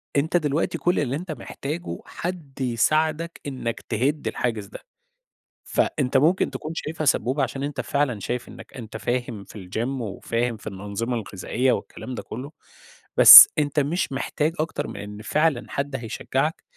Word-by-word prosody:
أنت 155 +5 +2
دلوقتي 150 -1 -1
كل 175 +1 +1
اللي 135 -2 -1
أنت 175 +3 -5
محتاجه 150 +4 -6
حد 160 -7 -6
يساعدك 155 +7 0
إنك 130 -4 -4
تهد 135 +7 0
الحاجز 115 -4 -2
ده، - - -11 0.8
فأنت 135 -3 0
ممكن 160 +7 +2
تكون 155 - -6
شايفها 160 0 -4
سبّوبة 135 +1 +1
عشان 135 +1 -3
أنت 145 0 -3
فعلًا 140 -6 -1
شايف 125 +5 -4
إنك 115 -1 -13
أنت 110 -4 -8
فاهم 120 -4 -3
في 95 -3 -12
الGym 125 +6 -3
وفاهم 115 +2 -2
في 105 - -12
الأنظمة 105 +4 -4
الغذائية 115 +4 -1
والكلام 130 - -5
ده - - -6
كلّه، 130 +6 -8 0.7
بس - - +13
أنت 145 0 0
مش 145 +2 -1
محتاج 150 +3 -1
أكتر 160 +1 -2
من - - -8
إن 105 +1 -8
فعلًا 150 +3 +1
حد 140 0 -3
هيشجعك 135 +6 -3
135 Hz, 155 wpm, -24 LUFS, 115-150 Hz, 0.8 s, بس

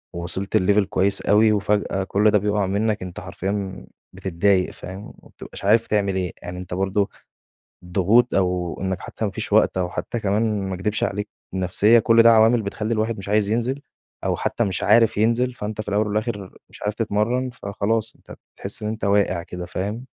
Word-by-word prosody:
وصلت 90 +5 -1
لLevel 100 +2 +3
كويس 95 +1 +1
أوي، 110 +1 +4
وفجأة 100 -2 0
كل 105 +2 +2
ده 105 - +4
بيبقع 105 0 0
منّك، 105 +3 0
أنت 90 -1 -7
حرفيًا 95 +2 -4 0.3
بتتضايق 95 +1 +1
فاهم، 95 +2 -9
وما - - -15
بتبقاش - - -10
عارف 115 +3 +4
تعمل 100 -2 0
إيه، 90 -2 -2
يعني 90 +1 -7
أنت 90 -1 -7
برضه 95 +2 0 0.7
الضغوط 100 +7 +3
أو 90 -2 0
إنّك 95 0 -2
حتى 110 - -5
ما 100 - -2
فيش - - -4
وقت - - +4
أو 90 -1 0
حتى 120 +6 -4
كمان- 105 0 0
ما 95 - -3
أكدبش 105 +4 -1
عليك- 105 +1 -2 0.2
النفسية، 95 +5 +4
كل 115 +1 +5
ده 115 - +8
عوامل 115 +1 +5
بتخلّي 110 +2 -3
الواحد 110 0 -1
مش 100 0 -8
عايز 105 -1 +2
ينزل 125 +5 -1 0.4
أو - - 0
حتى 120 - -1
مش 95 -3 -2
عارف 110 0 +4
ينزل، 115 +3 +2
فأنت 110 -2 -5
في 105 - -6
الأول 105 +1 +1
والآخر 105 -2 -3
مش - - -14
عارف 105 +1 -1
تتمرن، 115 +4 0
فخلاص 110 0 -2
أنت - - -13 0.2
بتحس - - -5
إن - - -2
أنت 110 -1 -4
واقع 100 -3 +2
كده 90 0 -7
فاهم؟ 105 +7 -4
105 Hz, 185 wpm, -22 LUFS, 95-110 Hz, 0.7 s, ده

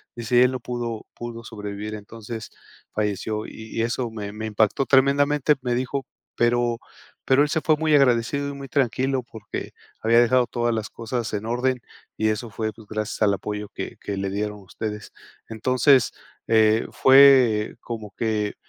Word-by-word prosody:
dice: 120 +1 +3
"Él 125 - +3
no 130 - -4
pudo 120 -2 -4
pudo 115 -1 -7
sobrevivir, 105 -1 -6
entonces 110 +1 -8 0.4
falleció". 105 +1 -2
Y 110 0 -9
y - - +3
eso 120 0 -1
me 105 -2 -6
me 110 +1 -5
impactó 110 +5 +1
tremendamente. 140 +2 +4
Me 125 -1 -1
dijo: 130 +2 -2 0.3
"Pero 120 0 +1 0.4
pero 135 +2 +4
él 150 - -1
se 160 0 0
fue 155 -1 +3
muy 155 0 +1
agradecido 135 +1 +2
y - - -5
muy 140 -1 -8
tranquilo, 130 0 0
porque 110 -3 -7 0.3
había 115 +1 +4
dejado 125 +1 +4
todas 120 -1 0
las 110 -1 -3
cosas 115 0 -4
en 105 +1 -3
orden, 125 +2 0 0.4
y 110 - +1
eso 110 +2 -2
fue, 110 0 -3
pues, 110 -1 -16
gracias 110 0 -4
al 100 -2 +4
apoyo 105 0 -5
que - - -6
que 100 -1 -4
le 95 0 -2
dieron 105 +1 -3
ustedes". 105 +2 -6 0.4
Entonces, 130 +3 +3 0.4
eh, 110 0 +4
fue 130 -5 +6
como 110 -3 -7
que 110 -3 -1
115 Hz, 165 wpm, -24 LUFS, 110-130 Hz, 0.4 s, fue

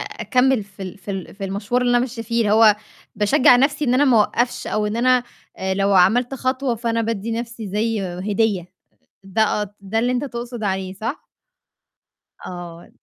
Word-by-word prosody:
أكمل 255 -2 +1
في 195 0 -12
ال 185 +1 -7
في 200 - -8
ال 190 -2 -6
في 195 0 -6
المشوار 200 +5 -1
اللي 245 - +1
أنا 245 - +4
ماشية 240 -1 -3
فيه، 230 +1 -1
اللي 210 -2 +2
هو 215 -1 +6 0.4
باشجّع 210 +4 +5
نفْسي 285 +3 +1
إن 250 -2 +2
أنا 275 +3 +4
ما 260 -4 +4
أوقفش، 240 +3 0
أو 215 0 -1
إن 210 +2 -2
أنا 250 +1 +3 0.3
آآ، 190 0 -2
لو 195 +1 +1
عملت 235 +8 +4
خطوة 260 -1 -1
فأنا 230 0 -1
بادّي 225 0 -2
نفْسي 230 -1 -5
زي 215 +2 -1
هدية، 190 0 -1 0.5
ده 210 +2 +1
ات 205 0 -6
ده 200 +3 -1
اللي 245 +2 +1
أنت 250 +2 -1
تقصد 240 -3 -6
عليه 190 -1 -2
صح؟ 225 - -5 1.2
آه. 175 -1 -9
220 Hz, 185 wpm, -21 LUFS, 195-245 Hz, 1.2 s, هو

